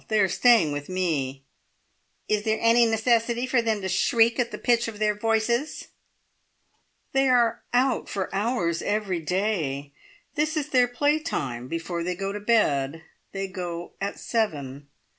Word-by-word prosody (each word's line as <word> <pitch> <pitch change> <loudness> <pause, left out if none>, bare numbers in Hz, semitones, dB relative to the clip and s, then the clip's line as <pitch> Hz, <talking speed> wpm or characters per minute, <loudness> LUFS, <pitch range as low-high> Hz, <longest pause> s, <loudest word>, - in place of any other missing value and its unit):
They 215 -1 +1
are 195 - +4
staying 220 -4 +4
with 145 +2 -5
me." 145 -8 -2 0.8
"Is 210 -1 +1
there 220 0 0
any 230 +1 +5
necessity 230 +2 +1
for 255 -1 +2
them 220 -3 -1
to 190 - -3
shriek 225 +6 +2
at 240 -1 +1
the - - -6
pitch 235 -1 +2
of 225 -2 -6
their 210 0 +1
voices?" 225 +6 -1 1.2
"They 270 0 +2
are 235 -2 +3
out 250 +1 +1
for 195 -2 -3
hours 195 -5 0
every 205 -4 -1
day. 160 -6 -2 0.4
This 310 +2 0
is 300 -1 -2
their 250 -3 +4
play 290 +5 +1
time 130 - -4
before 165 +3 -4
they 180 +1 -2
go 195 +2 -3
to 205 - -5
bed. 160 -9 +1 0.3
They 195 0 -3
go 175 -2 -6
at 200 +1 -3
seven." 145 - -2
210 Hz, 160 wpm, -25 LUFS, 170-235 Hz, 1.2 s, any